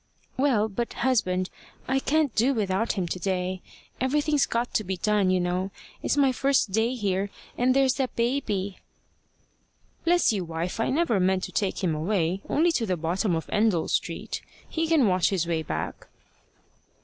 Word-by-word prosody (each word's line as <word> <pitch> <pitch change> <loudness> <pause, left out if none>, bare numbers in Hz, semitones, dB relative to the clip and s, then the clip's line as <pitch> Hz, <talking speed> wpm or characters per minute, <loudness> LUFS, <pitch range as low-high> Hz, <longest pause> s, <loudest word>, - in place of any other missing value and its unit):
"Well, 255 -6 +2
but, 225 +3 -3
husband, 185 -8 +1 0.4
I 265 +1 +2
can't 290 -1 +1
do 255 +5 +2
without 205 0 0
him 185 -4 -2
to 180 - -3
day. 185 0 -2 0.4
Everything's 290 +2 +2
got 235 +1 -1
to 215 - +1
be 190 -1 -3
done, 210 0 +2
you 185 0 +3
know. 180 +2 -1 0.3
It's - - 0
my 275 -2 +4
first 270 -4 +1
day 225 +5 +1
here. 200 -3 -1 0.3
And 255 +1 +2
there's 270 -2 +4
that 265 -3 -2
baby!" 235 -6 -1 1.2
"Bless 345 -7 +3
you, 195 -3 -1
wife! 170 +4 -4
I 225 - +1
never 270 - +2
meant 185 0 +2
to - - -4
take 200 -1 -1
him 170 -3 +2
away 175 +2 0
only 335 +3 +3
to 235 -8 0
the 185 -2 0
bottom 170 +3 0
of 160 - -3
Endell 210 -6 +2
Street. - - -2 0.3
He 325 0 -1
can 315 -8 +4
watch 185 -2 +3
his 185 -4 0
way 165 -1 0
back." 80 - -5
210 Hz, 175 wpm, -26 LUFS, 185-260 Hz, 1.2 s, my